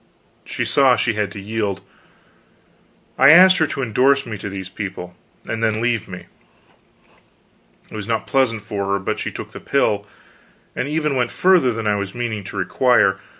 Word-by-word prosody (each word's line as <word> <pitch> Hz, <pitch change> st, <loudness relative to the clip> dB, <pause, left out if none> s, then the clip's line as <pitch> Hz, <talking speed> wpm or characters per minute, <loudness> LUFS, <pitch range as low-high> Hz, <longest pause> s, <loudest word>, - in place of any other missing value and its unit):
She -, -, -3 dB
saw 135 Hz, -3 st, +4 dB
she 120 Hz, -, 0 dB
had 105 Hz, -1 st, -2 dB
to 100 Hz, -, -8 dB
yield. 100 Hz, -1 st, -3 dB, 1.4 s
I 135 Hz, -, +7 dB
asked 185 Hz, +4 st, +8 dB
her 160 Hz, -, +2 dB
to 135 Hz, -, -4 dB
indorse 130 Hz, +4 st, +2 dB
me 115 Hz, -, -6 dB
to 100 Hz, -, -6 dB
these 95 Hz, -1 st, -6 dB
people, 95 Hz, -2 st, -7 dB, 0.3 s
and 115 Hz, -, -4 dB
then 110 Hz, -1 st, 0 dB
leave 115 Hz, -1 st, -1 dB
me. 90 Hz, -2 st, -9 dB, 1.7 s
It -, -, -9 dB
was 105 Hz, -1 st, -6 dB
not 115 Hz, -1 st, -1 dB
pleasant 115 Hz, -6 st, 0 dB
for 100 Hz, -2 st, -4 dB
her, 100 Hz, 0 st, +1 dB
but 100 Hz, -, -3 dB
she -, -, -4 dB
took -, -, -8 dB
the -, -, -9 dB
pill; 100 Hz, 0 st, 0 dB, 0.7 s
and 125 Hz, -, -2 dB
even 150 Hz, -1 st, -1 dB
went 125 Hz, -2 st, 0 dB
further 180 Hz, -9 st, +3 dB
than 115 Hz, -1 st, -5 dB
I 105 Hz, -1 st, +1 dB
was 100 Hz, +2 st, -5 dB
meaning 115 Hz, -4 st, -3 dB
to -, -, -8 dB
require. 120 Hz, -7 st, +2 dB
110 Hz, 180 wpm, -20 LUFS, 100-130 Hz, 1.7 s, asked